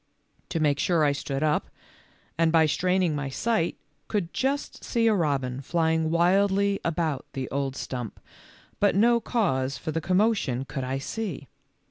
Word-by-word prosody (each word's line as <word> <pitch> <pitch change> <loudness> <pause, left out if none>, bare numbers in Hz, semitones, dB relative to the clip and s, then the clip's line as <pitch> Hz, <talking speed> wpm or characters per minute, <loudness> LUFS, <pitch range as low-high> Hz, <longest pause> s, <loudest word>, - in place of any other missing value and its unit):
To 175 -2 -1
make 145 -2 +2
sure 170 -3 +2
I 145 - +4
stood 140 0 -3
up, 150 -1 +1 0.7
and 165 0 +2
by 160 -1 +5
straining 180 +1 +1
my 145 -2 -3
sight 215 - 0 0.3
could 195 -6 -2
just 275 +2 -2
see 230 -2 0
a 225 - +5
robin 140 -8 0
flying 160 +1 +1
wildly 195 +4 +3
about 160 -4 -1
the 130 -2 -3
old 135 -1 -2
stump, 125 -5 -5 0.6
but 205 -2 +3
no 235 +4 +4
cause 140 - 0
for 155 - -4
the 165 +1 -2
com 185 +3 +1
motion 195 - +1
could 135 -1 -4
I 130 +1 -2
see. 150 - -5
160 Hz, 160 wpm, -26 LUFS, 140-195 Hz, 0.7 s, by